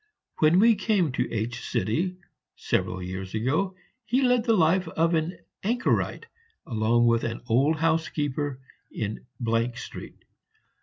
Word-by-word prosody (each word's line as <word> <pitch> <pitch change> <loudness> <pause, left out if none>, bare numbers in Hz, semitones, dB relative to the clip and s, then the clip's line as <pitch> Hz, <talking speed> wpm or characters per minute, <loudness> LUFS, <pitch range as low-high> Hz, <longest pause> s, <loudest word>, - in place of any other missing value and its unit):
When 155 +3 +5
we 230 +3 +6
came 200 - +1
to - - -2
H, 115 +2 -3 1.0
several 90 0 -1
years 95 +2 -5
ago, 155 - 0 0.3
he 255 +4 +1
led 250 -2 +3
the 225 -3 +3
life 175 +2 +3
of 165 +1 +1
an 160 +2 0 0.2
anchorite, 240 - 0 0.4
along 115 +1 +2
with 115 -1 +3
an 115 0 -3
old 135 +7 +3
housekeeper, 150 -4 -1 0.3
in 105 0 -4 0.5
Street. - - -9
155 Hz, 120 wpm, -26 LUFS, 115-185 Hz, 1.0 s, we